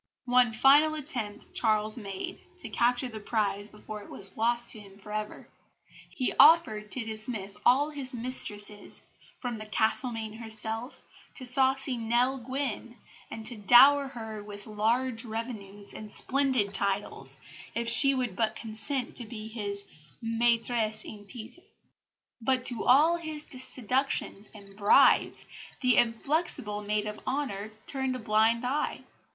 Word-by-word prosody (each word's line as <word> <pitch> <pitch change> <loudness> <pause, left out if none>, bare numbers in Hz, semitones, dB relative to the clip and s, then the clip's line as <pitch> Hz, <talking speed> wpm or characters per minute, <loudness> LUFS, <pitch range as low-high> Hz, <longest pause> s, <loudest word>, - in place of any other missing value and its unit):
One 245 -1 +4
final 285 +7 +5
attempt 245 -9 -5
Charles 215 -1 +1
made 195 -5 -7 0.2
to - - -8
capture 245 +2 +1
the 220 -3 -8
prize 205 -1 -2
before 210 0 -10
it - - -14
was 195 -1 -11
lost 235 +1 0
to 220 - -5
him 200 -1 -15
for 210 +1 -12
ever. 215 0 -5 0.6
He 255 - -2
offered 290 -10 +5
to 245 0 -3
dismiss 215 -2 -4
all 285 +5 +3
his 270 -3 -5
mistresses, 210 -4 0 0.3
from 240 -3 -5
the 215 - -9
Castlemaine 220 0 0
herself 220 +2 -4 0.3
to 255 - -6
saucy 265 0 +2
Nell 240 +4 +1
Gwynn, 245 -2 -4 0.3
and 220 -1 -8
to 240 +2 -4
dower 270 +7 +6
her 220 -5 -8
with 205 -1 -10
large 230 +3 0
revenues 215 -3 -7
and 215 -1 -9
splendid 260 -7 +1
titles 200 +1 -1 0.4
if 235 0 -2
she 275 +3 +8
would 250 -7 -3
but 220 0 -1
consent 230 +4 -3
to 240 - -4
be 215 -1 -8
his 200 -3 -1 0.3
maitresse 230 -1 +2
en 205 -1 -11
titre; 245 +8 -10 0.8
but 255 +2 +1
to 245 -4 +4
all 310 +7 +5
his 315 -3 -6
seductions 255 -4 -2
and 200 -1 -14
bribes 205 0 +4 0.4
the 255 -2 +3
inflexible 230 -3 0
maid 210 0 -2
of 210 0 -6
honour 260 -7 -3 0.2
turned 265 -2 -2
a - - -2
blind 225 +1 +1
eye. 275 +4 -2
230 Hz, 140 wpm, -28 LUFS, 215-255 Hz, 0.8 s, she